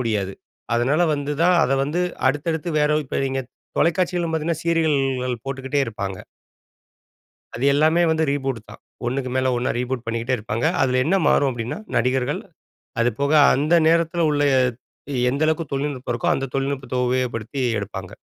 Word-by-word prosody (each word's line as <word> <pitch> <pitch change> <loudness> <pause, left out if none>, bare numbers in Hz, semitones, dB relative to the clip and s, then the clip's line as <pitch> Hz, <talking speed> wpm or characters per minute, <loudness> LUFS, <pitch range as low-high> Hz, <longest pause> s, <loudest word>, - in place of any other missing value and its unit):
முடியாது. 105 -5 -1 0.4
அதனால 130 +7 +2
வந்துதான் 150 +5 +1
அத 130 - 0
வந்து 155 +5 -1 0.3
அடுத்தடுத்து 160 +4 -1
வேற 150 +1 +3
இப்ப 130 - -3
நீங்க, 135 0 -1 0.4
தொலைக்காட்சிகளும் 175 -1 +1
பாத்தீங்கன்னா, 160 +1 -2
சீரியல்கள் 135 -7 0
போட்டுக்கிட்டே 135 +1 -2
இருப்பாங்க. 100 -3 -4 1.4
அது 120 - -5
எல்லாமே 155 +4 +3
வந்து 160 0 +1
ரீபூட்டு 135 -5 -2
தான். - - -12 0.2
ஒண்ணுக்கு 130 +1 -2
மேல 130 0 +2
ஒண்ணா, 125 - 0
ரீபூட் 125 -1 -3
பண்ணிக்கிட்டே 115 +3 -1
இருப்பாங்க. 110 +2 -3 0.2
அதுல 130 -1 +2
என்ன 175 +6 +2
மாறும் 140 -1 +4
அப்படினா, 120 - -4 0.2
"நடிகர்கள்". 125 +2 +1 0.6
அது 120 - +3
போக 140 +1 +1 0.2
அந்த 150 +6 +2
நேரத்துல 170 +1 +2
உள்ள, 145 - 0 0.9
எந்த 140 +3 0
அளவுக்கு 160 -2 -1
தொழில்நுட்பம் 135 -3 -2
இருக்கோ, 120 - 0
அந்த 135 - -2
தொழில்நுட்பத்த 135 -2 -2
உபயோகப்படுத்தி 125 0 -2 0.2
எடுப்பாங்க. 95 -2 -7
135 Hz, 140 wpm, -22 LUFS, 125-155 Hz, 1.4 s, மாறும்